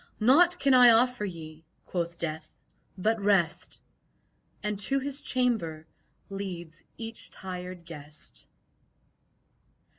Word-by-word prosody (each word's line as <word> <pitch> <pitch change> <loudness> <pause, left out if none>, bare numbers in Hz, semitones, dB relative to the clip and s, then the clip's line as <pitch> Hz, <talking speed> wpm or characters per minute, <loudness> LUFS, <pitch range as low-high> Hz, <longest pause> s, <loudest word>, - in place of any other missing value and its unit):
"Naught 320 +11 +5
can 275 -1 +3
I 250 -1 +9
offer 240 -1 +4
ye," 160 -4 -8 0.2
quoth 170 -1 -3
Death, 155 -2 -4 0.5
"but 215 +3 +1
rest!" 190 -5 +1 0.8
And 210 -1 -2
to 270 +6 +1
his 275 +1 -1
chamber 220 - 0 0.4
leads 180 -4 -6
each 225 0 -6
tired 180 -1 -7
guest. 150 - -10
195 Hz, 100 wpm, -28 LUFS, 165-240 Hz, 0.8 s, I